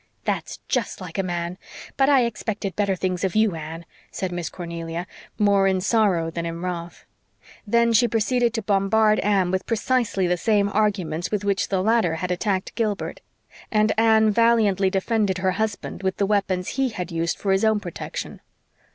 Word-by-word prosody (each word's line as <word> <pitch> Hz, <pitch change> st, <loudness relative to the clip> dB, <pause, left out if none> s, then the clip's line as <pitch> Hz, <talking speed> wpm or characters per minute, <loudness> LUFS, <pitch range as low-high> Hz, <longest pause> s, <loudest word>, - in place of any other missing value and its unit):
"That's -, -, -2 dB
just 250 Hz, -5 st, -1 dB
like 185 Hz, 0 st, -6 dB
a -, -, +4 dB
man. 175 Hz, 0 st, -4 dB, 0.4 s
But 270 Hz, 0 st, +3 dB
I 270 Hz, -3 st, +5 dB
expected 210 Hz, -3 st, -4 dB
better 200 Hz, -2 st, +1 dB
things 185 Hz, 0 st, -2 dB
of 190 Hz, 0 st, -1 dB
you, 215 Hz, -3 st, +3 dB
Anne," 165 Hz, +1 st, -7 dB, 0.2 s
said 185 Hz, -2 st, -4 dB
Miss 175 Hz, -2 st, -3 dB
Cornelia, 170 Hz, -1 st, -5 dB, 0.3 s
more 200 Hz, -2 st, +3 dB
in 190 Hz, -1 st, +2 dB
sorrow 190 Hz, -5 st, +2 dB
than 170 Hz, +1 st, -4 dB
in 170 Hz, +1 st, -5 dB
wrath; 175 Hz, -1 st, -5 dB, 0.6 s
then 235 Hz, +2 st, +3 dB
she 240 Hz, +2 st, +5 dB
proceeded 235 Hz, +2 st, +1 dB
to 225 Hz, -, -2 dB
bombard 210 Hz, +2 st, +3 dB
Anne 195 Hz, -3 st, +2 dB
with 190 Hz, 0 st, -2 dB
precisely 230 Hz, -4 st, 0 dB
the 180 Hz, 0 st, +1 dB
same 205 Hz, +1 st, +2 dB
arguments 190 Hz, -6 st, 0 dB
with 205 Hz, -1 st, -2 dB
which 200 Hz, -1 st, +1 dB
the 190 Hz, -2 st, 0 dB
latter 220 Hz, -6 st, +2 dB
had 180 Hz, +2 st, -3 dB
attacked 190 Hz, +1 st, -1 dB
Gilbert; 215 Hz, -4 st, -2 dB, 0.5 s
and 215 Hz, 0 st, +3 dB
Anne 220 Hz, -1 st, +4 dB
valiantly 210 Hz, -4 st, +3 dB
defended 195 Hz, 0 st, 0 dB
her 185 Hz, 0 st, +1 dB
husband 215 Hz, +1 st, -3 dB
with 190 Hz, -1 st, -1 dB
the 200 Hz, -, +2 dB
weapons 195 Hz, -3 st, 0 dB
he 270 Hz, -1 st, 0 dB
had 180 Hz, -5 st, -5 dB
used 165 Hz, 0 st, -1 dB
for 195 Hz, -, -1 dB
his 190 Hz, +2 st, +2 dB
own 220 Hz, -1 st, +3 dB
protection. 175 Hz, -5 st, -6 dB
195 Hz, 175 wpm, -23 LUFS, 180-220 Hz, 0.6 s, I